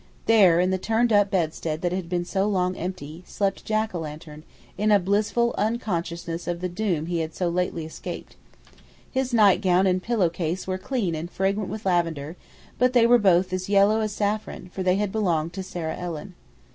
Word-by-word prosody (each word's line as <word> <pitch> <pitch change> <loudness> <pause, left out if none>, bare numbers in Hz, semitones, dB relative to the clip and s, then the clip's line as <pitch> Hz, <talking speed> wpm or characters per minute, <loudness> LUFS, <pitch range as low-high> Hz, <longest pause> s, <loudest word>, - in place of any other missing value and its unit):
There, 195 -7 +5
in 180 +1 +2
the 190 - 0
turn 225 +4 +1
up 205 -1 +4
bedstead 160 -3 -2
that 175 - +1
had 180 -2 -3
been 175 -1 -1
so 195 +2 0
long 185 -3 0
empty, 175 -2 -6
slept 195 -1 -2
Jack 215 -1 0
o' 175 - -3
lantern, 155 0 -8 0.3
in 210 +1 0
blissful 215 +5 +1
unconsciousness 175 -6 -2
of 175 -1 -2
the 180 - -2
doom 175 -4 -1
he 170 0 -2
had 160 0 -4
so 180 -2 0
lately 170 -2 -1
escaped. 160 - -8 0.8
His 260 -1 -1
nightgown 195 -4 +4
and 185 -1 +2
pillow 215 -5 +1
case 170 +1 -3
were 185 0 -3
clean 210 -6 -2
and 160 +2 -4
fragrant 195 +2 -1
with 215 +1 -6
lavender, 165 -4 0 0.4
but 250 +1 +3
they 240 -2 +5
were 240 +1 +6
both 185 -2 +3
as 185 +1 -3
yellow 205 +2 +4
as 215 -1 -1
saffron, 205 -3 -3
for 190 - -4
they 185 0 +2
had 205 0 -1
belonged 170 -6 0
to 190 - -4
Sarah 170 -4 -4
Ellen. 175 +1 -6
185 Hz, 190 wpm, -25 LUFS, 170-210 Hz, 0.8 s, were